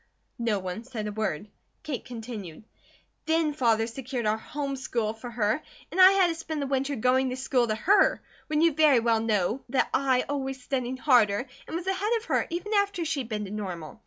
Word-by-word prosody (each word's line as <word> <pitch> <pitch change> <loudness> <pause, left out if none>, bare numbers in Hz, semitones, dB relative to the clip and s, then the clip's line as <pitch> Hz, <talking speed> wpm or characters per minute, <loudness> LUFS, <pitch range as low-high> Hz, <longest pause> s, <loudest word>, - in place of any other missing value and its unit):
No 230 -3 +1
one 185 +3 -5
said 235 -4 -5
a 210 - -3
word. 210 -3 -2 0.4
Kate 275 -6 -4
continued: 220 -8 -8 0.6
"Then 320 -1 +2
Father 230 -5 +2
secured 245 +1 -5
our 215 0 +2
home 275 +3 -4
school 235 -4 -2
for 225 +2 -9
her 225 +3 0 0.3
and 375 - +3
I 375 +1 +9
had 390 -1 +5
to - - 0
spend 320 -1 -5
the 280 - -1
winter 275 +1 -1
going 255 +2 +2
to 255 - -3
school 255 -2 +1
to 215 - 0
her, 395 - +4 0.3
when 305 0 +1
you 335 0 +5
very 295 -4 +5
well 230 -1 +2
know 220 +2 0
that 265 - +1
I 260 -2 +3
always 270 -2 -3
studied 255 0 -3
harder, 240 -5 +3 0.2
and - - -5
was 340 +1 -3
ahead 385 +4 0
of 450 - -8
her, - - 0
even 355 +6 -3
after 400 -4 +1
she'd 285 -7 -2
been 210 -2 -3
to 195 - -8
Normal. 185 -7 -6
255 Hz, 205 wpm, -27 LUFS, 220-305 Hz, 0.6 s, I